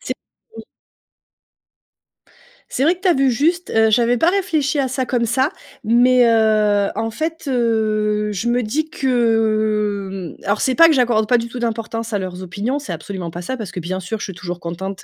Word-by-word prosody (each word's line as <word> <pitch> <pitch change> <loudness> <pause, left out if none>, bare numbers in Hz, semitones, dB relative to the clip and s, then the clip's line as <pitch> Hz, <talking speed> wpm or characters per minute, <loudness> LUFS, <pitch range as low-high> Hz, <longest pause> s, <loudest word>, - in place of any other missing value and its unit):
C'est - - -4 0.4
oui. - - -9 2.1
C'est 260 - -1
vrai 330 +5 +3
que 360 - -22
tu 380 - 0
as 355 - +5
vu 270 -2 +2
juste. 335 +8 0
Heu, 220 0 +3
j'avais 235 +2 +3
pas 325 - +3
réfléchi 325 -7 0
à 270 -2 +1
ça 260 0 -2
comme 240 -1 0
ça. 260 +6 +1 0.3
Mais, 245 +2 +5
heu, 215 -3 +3
en 225 0 -2
fait, 320 +5 -4
heu, 215 -4 0
je 205 +4 -3
me 245 +1 +2
dis 300 +8 -2
que, 215 - 0
hem, - - -22
alors 205 +1 0
c'est 260 - +1
pas 330 0 +8
que 315 - +4
j'accorde 235 -5 +2
pas 245 - +5
du 235 - -3
tout 245 +1 -7
d'importance 230 -1 -3
à 205 - 0
leurs 185 -1 -6
opinions, 205 +9 -3
c'est 290 - -6
absolument 185 -5 -6
pas 175 - -6
ça. 260 +9 -4
Parce 215 -7 -7
que, - - -5
bien 185 +2 -4
sûr, 200 +5 -4
je - - -4
suis 195 - -7
toujours 175 0 -6
contente, 185 +3 -6
225 Hz, 205 wpm, -19 LUFS, 205-260 Hz, 2.1 s, pas